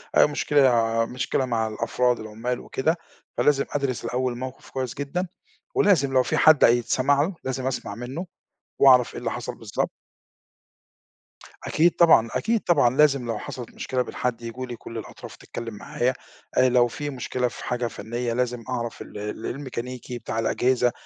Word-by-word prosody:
آآ - - +7
مشكلة 120 -6 +3
مشكلة 130 +2 -1
مع 115 -3 0
الأفراد، 120 +3 0
العُمّال 110 +3 -4
وكده، 160 +6 -1 0.4
فلازم 140 -2 +3
أدرس 140 -5 -2
الأول 125 +1 -1
الموقف 130 +2 -7
كويس 130 -2 -3
جدًا 145 +7 -3 0.5
ولازم 165 -10 +3
لو 130 -1 +5
في - - -1
حد 155 -2 +6
هيتسمع 125 +4 +4
له 175 +5 -1
لازم 130 0 -2
أسمع 125 -6 -3
منّه 130 - -5 0.5
وأعرف 130 -3 +6
إيه - - -5
اللي - - -2
حصل - - -5
بالضب - - -2 1.8
أكيد 170 +3 +4
طبعًا، 160 -9 +6
أكيد 230 +1 +1
طبعًا. 135 -8 +3
لازم 140 -4 +4
لو 115 -2 -2
حصلت 120 -3 -7
مشكلة 130 -1 -1
من - - -10
حد 125 -2 -2
ييجوا 115 +2 -5
لي 120 -1 -6
كل 115 0 -9
الأطراف 110 - -9
تتكلّم 115 -1 -7
معايا. 120 +4 -1 0.4
آآ 130 - +5
لو 125 -1 +4
في 145 +5 -5
مشكلة 125 -2 -2
في - - -8
حاجة 125 -1 -1
فنيّة 115 +2 -4
لازم 125 -1 -1
أعرف 120 -2 -3
ال - - -9
ال 105 +2 -5
الميكانيكي 125 -2 -5
بتاع 115 - -3
الأجهزة، 125 +2 +2
125 Hz, 160 wpm, -25 LUFS, 120-135 Hz, 1.8 s, آآ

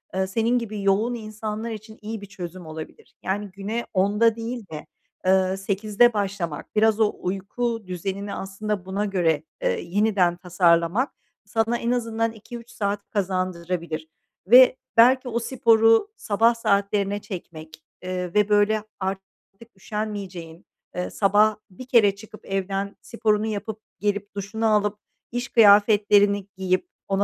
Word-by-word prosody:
ııı, 190 0 0
senin 230 +5 +1
gibi 215 -3 -5
yoğun 205 +5 +2
insanlar 215 0 -5
için 220 0 -9
iyi 215 0 -6
bir - - -8
çözüm 185 -3 -8
olabilir. 155 0 -10
Yani, 200 +2 -2
güne 205 +5 -4
10.00'da 210 +4 +3
değil 230 0 -5
de, 155 -1 -7 0.4
eee, 190 0 +3
08.00'de 210 +4 +2
başlamak, 195 -7 -3
biraz 220 0 +3
o 215 -2 +3
uyku 215 +5 -3
düzenini 195 +3 -4
aslında 195 0 -4
buna 195 +2 -2
göre, 170 -6 +1 0.2
ııı, - - +2
yeniden 195 -2 +1
tasarlamak 175 - +2 0.3
sana 225 +1 0
en 235 0 -1
azından 230 -2 0
2-3 230 +2 -11
saat 200 0 -3
kazandırabilir 180 -4 -2 0.4
ve 255 +4 +8 0.2
belki 255 +3 +6
o 235 0 -1
sporu 225 - +4
sabah 225 - +2
saatlerine 200 -2 0
çekmek, 160 -5 -9 0.2
ııı, 185 - -3 0.2
ve 210 0 +3
böyle 210 +1 +3 0.2
artık 190 0 -3 0.5
üşenmeyeceğin, 190 -5 -6 0.3
ııı, 180 - -3
sabah 210 +2 +3
bir 220 +7 -11
kere 215 -6 +4
çıkıp 215 +1 -14
evden 195 +1 -2
sporunu 220 -3 0
yapıp 215 0 -4 0.2
gelip 205 +1 -2
duşunu 205 +3 -3
alıp 210 0 +1 0.3
iş 245 +1 -3
kıyafetlerini 205 -3 +5
giyip 185 - 0 0.2
ona 195 0 +1
205 Hz, 135 wpm, -24 LUFS, 190-220 Hz, 0.5 s, ve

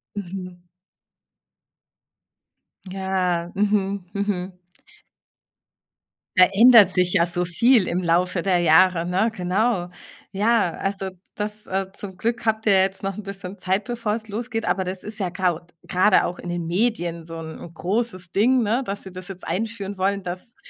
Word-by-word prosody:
Mhm. 180 -2 -7 2.3
Ja, 185 -3 -1
mhm, 200 -2 0
mhm. 190 -2 -3 1.8
Verändert 210 +3 +7
sich 180 -1 +1
ja 170 - +4
so 175 +1 -1
viel 225 +4 +3
im 180 +1 -1
Laufe 175 +1 +1
der 185 -1 +2
Jahre, 175 +1 +4
ne, 190 +6 +1
genau. 185 +1 0 0.4
Ja, 210 -2 +2
also, 195 -1 -2
d - - -22 0.2
das, 210 0 -3
äh 190 0 -2
zum 195 -2 -5
Glück 230 +2 -2
habt 220 0 0
ihr 205 - +5
jetzt 190 +1 -1
noch 195 -1 -2
'n 215 - -6
bisschen 195 -1 -7
Zeit, 190 +2 0
bevor 230 -3 -2
es 220 -1 -7
losgeht, 225 +1 -4
aber 190 0 0
das 185 +1 -5
ist 215 - -3
ja 185 - -1
graud 175 -2 -2 0.2
grade 185 +2 +4
auch 175 - -4
in - - -8
den 175 -1 -3
Medien 175 -3 -1
so 165 0 -7
'n 160 +1 -9
großes 185 -1 -2
Ding, 245 +6 +3
ne, 225 +5 +1
dass 200 -1 -5
sie 190 - -10
das 185 +1 -7
jetzt 190 -2 -6
einführen 200 +1 -3
wollen, 195 +1 0
dass 185 +8 -5
190 Hz, 155 wpm, -23 LUFS, 180-210 Hz, 2.3 s, Verändert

